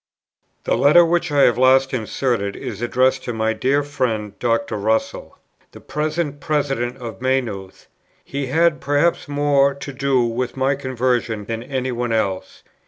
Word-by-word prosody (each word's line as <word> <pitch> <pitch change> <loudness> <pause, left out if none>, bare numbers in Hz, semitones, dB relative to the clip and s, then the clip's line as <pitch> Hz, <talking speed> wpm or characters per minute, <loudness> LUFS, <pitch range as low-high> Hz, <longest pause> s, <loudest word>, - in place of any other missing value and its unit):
The - - +1
letter 160 +5 +6
which 175 0 0
I 145 -1 +4
have 120 - +3
last 135 +1 +4
inserted, 115 -3 -1
is 105 0 -7
addressed 130 +2 +1
to 120 - -3
my 110 0 0
dear 135 +6 +1
friend, 120 -8 -2
Dr. 120 +3 0
Russell, 110 +2 -2 0.4
the - - -11
present 150 -1 -3
President 140 -6 -1
of 115 -4 -8
Maynooth. 120 -8 -2 0.4
He 140 -1 -4
had, 165 +3 +2
perhaps, 145 +5 +1
more 145 -1 +2
to 140 0 -8
do 135 -2 +1
with 120 +2 -3
my 135 +1 +2
conversion 125 -5 -1
than 115 +1 -4
any 130 0 -3
one 120 -1 -2
else. 100 -4 -2
130 Hz, 155 wpm, -20 LUFS, 115-145 Hz, 0.4 s, letter